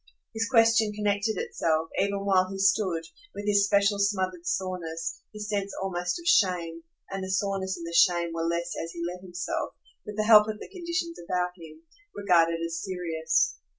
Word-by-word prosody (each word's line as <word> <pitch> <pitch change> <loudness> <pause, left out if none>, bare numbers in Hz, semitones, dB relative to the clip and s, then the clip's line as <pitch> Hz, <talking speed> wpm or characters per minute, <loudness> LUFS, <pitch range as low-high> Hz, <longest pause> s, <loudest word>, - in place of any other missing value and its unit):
His 225 0 -1
question 225 -3 +4
connected 205 0 0
itself, 160 -2 -1
even 200 0 0
while 185 -2 +3
he 195 - -6
stood, 195 -3 +2 0.3
with 205 - -6
his 200 -1 +3
special 200 0 +3
smothered 185 -3 -1
soreness, 170 -3 -3
his 210 -1 -6
sense 200 -1 -2
almost 180 - -2
of 340 - -12
shame; 175 - +2 0.3
and 195 0 -4
the 190 - -5
soreness 190 -1 -1
and 170 - -7
the 170 - -6
shame 170 -1 +4
were 165 - -3
less 170 +1 -2
as 165 - -7
he 170 0 -4
let 180 +1 -6
himself, 175 -1 -4 0.3
with 210 0 -8
the 215 - +2
help 215 -1 +8
of 215 -1 -4
the - - -9
conditions 340 -2 -4
about 180 0 -1
him, 160 -2 -13 0.3
regard 180 -5 +4
it 165 0 -2
as 165 0 -4
serious. 160 - 0
190 Hz, 185 wpm, -27 LUFS, 170-205 Hz, 0.3 s, help